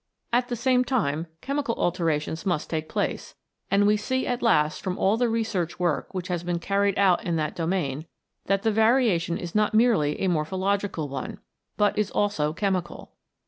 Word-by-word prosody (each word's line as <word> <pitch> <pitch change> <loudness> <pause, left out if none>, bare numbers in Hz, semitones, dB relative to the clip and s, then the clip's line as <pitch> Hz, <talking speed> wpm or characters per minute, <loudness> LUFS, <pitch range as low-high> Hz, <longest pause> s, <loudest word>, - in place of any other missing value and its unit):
At 245 +1 +2
the 245 - -2
same 250 +1 +2
time 170 - -1
chemical 275 -4 -1
alterations 165 -2 -1
must 175 -6 -1
take 155 -1 -2
place, - - -3 0.3
and 200 +1 +3
we 210 +1 +4
see 260 +5 -1
at 245 0 -2
last 155 -10 +2
from 185 -1 -3
all 195 +3 +3
the 240 +1 +1
research 220 -7 -1
work 175 -4 -1
which 185 -1 -4
has 175 -3 -2
been 175 0 -1
carried 200 +2 0
out 190 -3 +3
in 170 - -1
that 155 -1 -2
domain, 160 -4 -2 0.4
that 195 +1 +1
the 225 - +2
variation 220 -6 +2
is 170 -1 -6
not 215 0 +2
merely 215 -11 +3
a 190 - +1
morphological 185 +1 -1
one, 135 -2 -5 0.4
but 210 0 +2
is 210 -2 +1
also 200 -8 0
chemical. 185 0 -3
190 Hz, 180 wpm, -25 LUFS, 165-220 Hz, 0.4 s, we